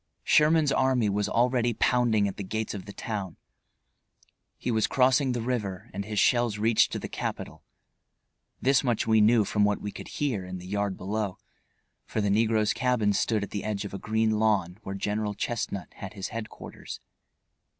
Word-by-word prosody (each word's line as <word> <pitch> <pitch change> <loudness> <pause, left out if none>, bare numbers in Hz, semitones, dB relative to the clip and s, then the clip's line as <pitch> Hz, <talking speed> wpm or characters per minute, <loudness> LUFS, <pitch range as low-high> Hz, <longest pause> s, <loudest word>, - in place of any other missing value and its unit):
Sherman's 150 -1 +4
army 130 -6 +2
was 105 +1 0
already 120 0 +2
pounding 115 -5 +2
at 100 - -5
the 100 - -4
gates 110 +3 -3
of 100 -3 -7
the 100 - -8
town. 100 -4 -5 1.2
He 125 - -2
was 110 -1 +2
crossing 130 0 +3
the 120 -2 -2
river 110 -4 -3
and 100 +2 -3
his 105 0 -5
shells 120 -1 +3
reached 110 +1 +3
to - - -1
the - - -5
capital. - - -5 1.0
This 135 +1 +3
much 120 -4 0
we 110 -1 +4
knew 110 0 +5
from 105 +1 +1
what 105 0 +2
we 105 - -5
could - - -9
hear 130 -10 -2
in 90 0 -6
the 90 - -10
yard 100 0 -2
below, 100 0 -3 0.7
for - - -2
the 100 -1 +1
negro's 110 +1 +2
cabin 120 -4 +1
stood 105 +1 +1
at 100 - -6
the 100 - -3
edge 105 -1 -2
of 100 - -7
a 100 - -4
green 110 0 +1
lawn 100 -4 +1
where 95 -1 -6
General 105 +1 -2
Chestnut 100 -3 -3
had 95 - -8
his 95 -2 -5
headquarters. 115 -1 -8
110 Hz, 180 wpm, -27 LUFS, 100-120 Hz, 1.2 s, knew